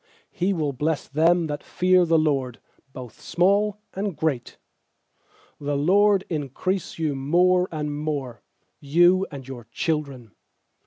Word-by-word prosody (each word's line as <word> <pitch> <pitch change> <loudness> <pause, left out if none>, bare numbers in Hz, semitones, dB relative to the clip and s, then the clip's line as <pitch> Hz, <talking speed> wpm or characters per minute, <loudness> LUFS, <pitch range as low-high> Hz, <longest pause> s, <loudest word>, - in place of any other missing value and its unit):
13He 185 +3 0
will 155 -6 -1
bless 150 +3 -2
them 165 +4 +2
that 145 -1 -4
fear 180 0 +2
the 165 -1 +3
LORD, 135 -6 0 0.3
Both 125 -4 -11
small 200 +3 +1 0.2
and 195 -3 -3
great. 145 -7 -2 1.0
I4The 145 0 -1
LORD 200 +1 +4
increase 160 +5 -3
you 155 -3 -1
more 180 +7 +2
and 150 -2 -3
more, 145 -6 -4 0.4
You 175 +6 +3
and 135 -3 -9
your 125 -4 -9
children. 140 -8 -3
155 Hz, 125 wpm, -24 LUFS, 140-180 Hz, 1.0 s, LORD